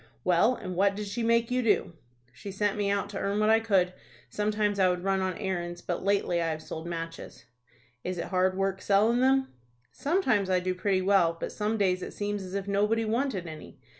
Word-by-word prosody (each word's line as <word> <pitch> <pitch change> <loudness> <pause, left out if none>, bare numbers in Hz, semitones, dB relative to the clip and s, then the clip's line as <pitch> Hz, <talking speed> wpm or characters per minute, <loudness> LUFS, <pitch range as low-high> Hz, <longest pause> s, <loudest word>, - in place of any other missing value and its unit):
Well, 185 +8 +3
and 185 -6 -6
what 200 +2 +2
did 210 +1 -4
she 205 +4 -4
make 230 +1 +2
you 250 0 +2
do?" 210 -6 +1 0.4
"She 200 - -8
sent 205 +1 0
me 205 -1 0
out 200 0 0
to 200 - -4
earn 200 +1 -1
what 215 +1 +3
I 225 - +5
could. 190 -5 +2 0.4
Sometimes 210 -1 0
I 185 -1 +5
would 180 0 -2
run 195 0 +1
on 185 -1 -2
errands, 175 -4 -3
but 175 - -3
lately 195 -3 +1
I 165 - 0
have 155 0 -4
sold 160 +1 -7
matches." 165 -7 -7 0.6
"Is 185 0 -3
it 170 - -4
hard 185 0 +1
work 195 0 -1
sellin' 215 +4 +3
them?" 265 +1 +3 0.4
"Sometimes 265 - +1
I 185 -1 +3
do 185 0 -1
pretty 185 0 0
well, 185 -4 +3
but - - -4
some 215 +1 -1
days 185 -3 +1
it - - -7
seems 205 0 -2
as 185 0 -7
if 200 -1 -3
nobody 210 +3 +1
wanted 230 -4 -1
any. 155 -4 -10
195 Hz, 215 wpm, -28 LUFS, 185-215 Hz, 0.6 s, I